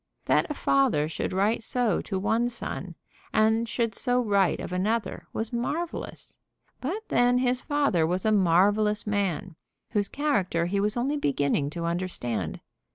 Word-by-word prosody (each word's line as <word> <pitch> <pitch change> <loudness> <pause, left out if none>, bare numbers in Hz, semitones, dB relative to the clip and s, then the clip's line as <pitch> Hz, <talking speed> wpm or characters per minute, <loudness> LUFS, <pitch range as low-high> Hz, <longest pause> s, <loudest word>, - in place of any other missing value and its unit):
That - - +2
a 300 - -3
father 260 - +2
should 160 - -3
write 205 +5 +1
so 240 -1 +1
to 195 - -3
one 225 +5 +1
son, 235 - -5 0.4
and 220 +1 +2
should 230 -1 -1
so 250 0 +1
write 200 -6 +2
of - - -5
another, 210 +5 -1
was 225 +2 -3
marvellous. 305 +8 -4 0.4
But 395 +12 -4
then 245 0 +3
his 250 0 +1
father 280 - +1
was 180 +3 -1
a 220 - +3
marvellous 205 +3 +3
man, 195 -5 -1 0.4
whose 205 -3 +1
character 200 - 0
he 195 +3 0
was 210 +3 +1
only 275 +5 0
beginning 140 - 0
to 170 - -2
understand. 120 - -2
210 Hz, 155 wpm, -27 LUFS, 185-245 Hz, 0.4 s, then